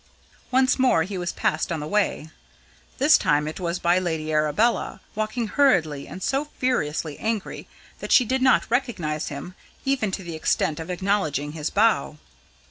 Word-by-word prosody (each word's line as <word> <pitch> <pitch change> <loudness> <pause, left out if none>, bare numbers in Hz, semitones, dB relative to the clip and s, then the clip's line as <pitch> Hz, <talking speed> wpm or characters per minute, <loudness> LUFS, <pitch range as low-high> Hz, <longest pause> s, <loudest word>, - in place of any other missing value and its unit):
Once 260 +1 +3
more 250 -11 +4
he 195 +4 -6
was 175 -1 -2
passed 155 +2 -1
on 165 - -1
the 150 - -5
way. 190 -4 -1 0.7
This 285 +3 +5
time 150 0 +1
it 155 - -6
was 175 -1 -2
by 175 +1 +2
Lady 160 -3 -2
Arabella, 155 +10 +1
walking 215 +2 -2
hurriedly 165 - +2
and 185 - -8
so 275 +2 0
furiously 155 - -1
angry 220 -2 -3 0.3
that - - -6
she 250 - +6
did 260 +3 0
not 260 0 +4
recognise 190 - -1
him, 150 +5 -7 0.3
even 270 -6 +1
to 190 0 -4
the 170 -1 -7
extent 155 -1 0
of 160 - -7
acknowledging 180 -6 -1
his 150 -1 -3
bow. 215 -7 +2
180 Hz, 165 wpm, -24 LUFS, 155-235 Hz, 0.7 s, she